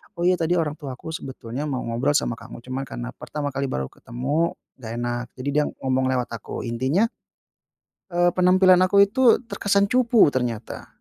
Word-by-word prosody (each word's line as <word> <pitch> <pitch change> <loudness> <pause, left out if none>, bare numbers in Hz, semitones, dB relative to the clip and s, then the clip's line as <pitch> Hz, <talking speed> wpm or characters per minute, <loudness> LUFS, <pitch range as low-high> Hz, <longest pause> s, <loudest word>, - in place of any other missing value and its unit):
"Oh, 170 - -3
iya, 180 0 +3
tadi 165 +2 +1
orang 160 -2 -1
tuaku 140 +2 -7
sebetulnya 135 -1 -5
mau 130 -3 -2
ngobrol 120 +5 0
sama 115 -4 0
kamu, 120 - -11
cuman 130 +1 -4
karena - - -6
pertama 145 -2 -5
kali 140 0 -2
baru 65 - -3
ketemu 140 +8 -2 0.2
nggak 115 -2 -7
enak, 120 0 -2
jadi 130 +2 -4
dia 150 +1 +2 0.2
ngomong 130 0 +1
lewat 125 -1 -2
aku." 115 -3 -6
Intinya, 130 - +1 1.0
eee, 175 -1 +2
penampilan 185 0 +5
aku 200 +1 +6
itu 230 +4 +4
terkesan 200 -3 +1
cupu 240 - +5
ternyata. 120 -3 -3
145 Hz, 170 wpm, -23 LUFS, 125-175 Hz, 1.0 s, aku